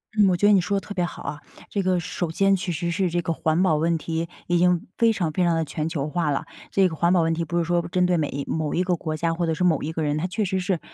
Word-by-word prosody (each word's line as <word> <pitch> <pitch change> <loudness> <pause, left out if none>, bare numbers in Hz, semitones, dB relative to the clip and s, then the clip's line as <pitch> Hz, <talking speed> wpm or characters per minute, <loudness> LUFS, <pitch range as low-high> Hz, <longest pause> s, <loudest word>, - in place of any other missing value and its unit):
嗯， 205 -3 +5
我 180 - +2
觉 205 - +3
得 210 - +6
你 195 - +5
说 200 +3 0
得 - - -15
特 205 - -5
别 180 -2 0
好 175 - -5
啊。 145 +1 -5 0.3
这 200 - -1
个 185 -1 +2
首 170 0 -3
先 195 +3 +3
其 180 -1 -3
实 170 +1 -2
是 185 +1 0
这 175 +1 0
个 165 0 -1
环 160 +1 +1
保 185 -5 +3
问 165 +2 +1
题 165 +1 -3 0.2
已 175 - +2
经 180 0 +2
非 230 -1 +4
常 175 -7 -1
非 180 - +1
常 170 -1 +3
地 165 - 0
全 155 +1 -3
球 150 -4 -2
化 165 0 -1
了。 140 - -1 0.3
这 195 -1 +4
个 165 - -5
环 170 +2 +2
保 180 -2 +4
问 165 0 +1
题 165 +1 -1
不 170 +2 -3
是 170 - +1
说 175 0 +1
针 180 0 +2
对 180 0 +2
每 155 -4 0
一 140 0 -4
某 155 -2 -2
一 180 - +1
个 180 -1 +1
国 155 -2 -4
家 165 +1 0
或 170 +1 -1
者 165 - 0
是 170 - -2
某 165 -5 +2
一 155 - -2
个 160 -1 -2
人， 150 0 0
它 155 - -1
确 195 +4 -1
实 190 0 -1
是 180 -2 -1
170 Hz, 350 characters per minute, -24 LUFS, 160-180 Hz, 0.3 s, 得